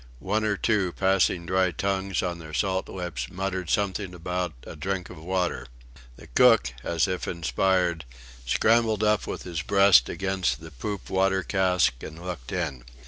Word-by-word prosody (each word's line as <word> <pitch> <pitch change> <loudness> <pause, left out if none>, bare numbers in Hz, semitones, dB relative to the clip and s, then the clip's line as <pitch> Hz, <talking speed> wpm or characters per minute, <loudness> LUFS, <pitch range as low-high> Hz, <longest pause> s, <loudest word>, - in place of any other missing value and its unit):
One 105 - -1
or 105 -2 +1
two, 100 -6 +1
passing 95 -2 +2
dry 95 +1 +2
tongues 95 +1 -1
on 85 -1 -3
their 80 -2 -8
salt 95 +1 0
lips, 85 -10 -5
muttered 95 -2 -3
something 100 -3 -1
about 90 0 -3
a - - -8
"drink 95 +3 -3
of - - -10
water." 90 -6 -1 0.5
The - - -14
cook, - - +4
as 85 +6 +1
if 90 -1 -3
inspired, 85 -1 0 0.4
scrambled 110 - +2
up 105 0 +2
with - - -5
his 85 -3 -4
breast 100 +1 +5
against 95 -2 -1
the 80 0 -11
poop 95 - -6
water 95 0 +2
cask 90 -6 +2
and 80 - -8
looked 85 -8 -7
in. 75 -9 -3
90 Hz, 160 wpm, -26 LUFS, 85-95 Hz, 0.5 s, breast